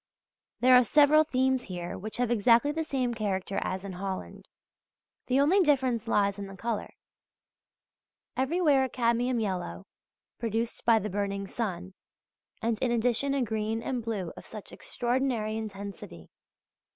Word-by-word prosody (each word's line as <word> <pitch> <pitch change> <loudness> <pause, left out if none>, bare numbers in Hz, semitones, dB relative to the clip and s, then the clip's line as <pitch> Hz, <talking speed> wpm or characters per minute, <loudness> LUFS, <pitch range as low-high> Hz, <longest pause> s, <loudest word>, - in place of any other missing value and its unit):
There 255 +1 +6
are 250 0 +8
several 300 +4 +5
themes 260 -3 +1
here 175 -2 -5
which 215 +4 -6
have 245 -1 0
exactly 235 +5 +4
the 320 +2 -2
same 260 -5 -1
character 200 -3 -2
as 185 +1 -3
in 195 - -5
Holland: 190 +1 -6 0.8
the 260 +1 +2
only 315 +8 +4
difference 260 - +2
lies 200 -2 +1
in 200 - -5
the 195 0 -10
colour. 230 -1 -3 1.4
Everywhere 285 0 +3
a 260 - -1
cadmium 240 +1 +1
yellow, 180 - -3 0.5
produced 230 0 -2
by 230 -1 +6
the 210 -2 -3
burning 200 0 -2
sun, 190 -3 -4 0.7
and 225 -1 0
in 255 - +2
addition 240 +4 +1
a 270 - +1
green 220 0 -2
and 245 -2 -2
blue 205 -7 -3
of - - -10
such 215 -2 -10
extraordinary 240 -3 -1
intensity! 200 - -7
230 Hz, 145 wpm, -28 LUFS, 200-255 Hz, 1.4 s, are